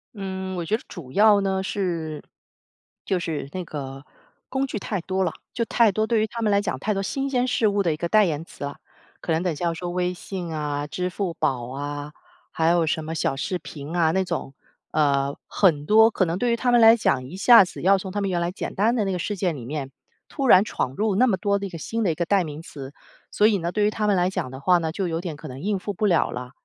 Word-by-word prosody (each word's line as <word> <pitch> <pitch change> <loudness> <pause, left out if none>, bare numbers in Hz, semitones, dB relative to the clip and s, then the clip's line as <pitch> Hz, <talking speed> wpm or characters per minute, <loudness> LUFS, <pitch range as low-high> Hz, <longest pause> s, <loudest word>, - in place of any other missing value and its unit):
嗯， 190 -1 -5
我 170 - -3
觉 210 - +1
得 225 - -6
主 140 -8 -9
要 210 +2 +6
呢 190 -1 0
是， 170 -6 -3 0.8
就 190 - +1
是 160 -5 -3
那 185 - -3
个， 135 -4 -7 0.5
工 270 0 -1
具 225 - -4
太 200 -1 -3
多 190 +2 -1
了。 175 - 0 0.2
就 235 - 0
太 230 -1 +4
多 215 +3 0
对 230 -1 +1
于 215 - +1
他 230 +2 -6
们 215 -2 +2
来 200 - +4
讲 185 -9 -3
太 210 +8 -1
多 195 - -1
新 275 +7 -2
鲜 250 -2 +1
事 220 -2 +2
物 205 0 +1
的 165 -4 +1
一 - - -6
个 170 +1 -3
代 215 +1 +5
言 160 -2 -2
词 145 - -8
啊， 140 - -5 0.5
可 165 - -3
能 160 - +2
等 180 -1 0
一 155 - -4
下 175 - -3
要 170 - +1
说 175 +2 -5
微 180 0 -1
信 180 -2 -6
啊、 145 -1 -2
支 180 +5 -3
付 180 -1 -3
宝 125 -5 -1
啊、 145 +2 -5 0.4
还 160 0 0
有 170 -1 +3
什 155 0 -1
么 160 - -4
小 145 - 0
视 180 +6 -2
频 150 0 -8
啊 160 -2 +3
那 190 +2 +1
种， 165 -6 -4 0.4
呃， 140 -2 +2
很 155 -7 +2
多 220 +5 +6
可 185 - +1
能 170 +1 -2
对 240 +3 +1
于 235 - +3
他 245 +1 +1
们 240 - +6
来 225 +1 +9
讲 165 - +1
一 165 +9 -9
下 230 +1 +8
子 180 - -8
要 195 +2 +5
从 190 0 -6
他 205 - -2
们 200 -1 -1
原 175 -2 0
来 170 +1 -1
简 185 - -6
单 220 +5 +2
的 215 -4 +1
那 195 - -1
个 180 - -2
事 205 +3 -3
件 175 -4 0
里 120 - -8
面， 140 0 -5 0.4
突 275 - -3
然 190 -4 +7
闯 130 -10 -2
入 210 +1 0
那 245 +6 +5
么 205 -7 +2
多 200 +1 +1
的 200 - -4
一 - - -5
个 170 - -7
新 225 +8 -3
的 180 - +2
一 - - -3
个 170 - -1
代 195 0 +2
名 150 0 -7
词。 140 -3 -9 0.4
所 210 - +4
以 215 -2 +3
呢， 170 0 -2
对 210 +2 +1
于 - - +4
他 215 0 -2
们 205 - +3
来 180 +1 +2
讲 130 -9 -4
的 130 - -8
话 180 +6 +4
呢， 160 -1 -2
就 185 +2 -2
有 165 0 -2
点 165 -5 -5
可 155 - -9
能 130 0 -8
应 200 0 -1
付 205 +2 -4
不 210 +4 -1
了 175 -5 +3
了。 125 0 -6
180 Hz, 295 characters per minute, -24 LUFS, 155-205 Hz, 0.8 s, 来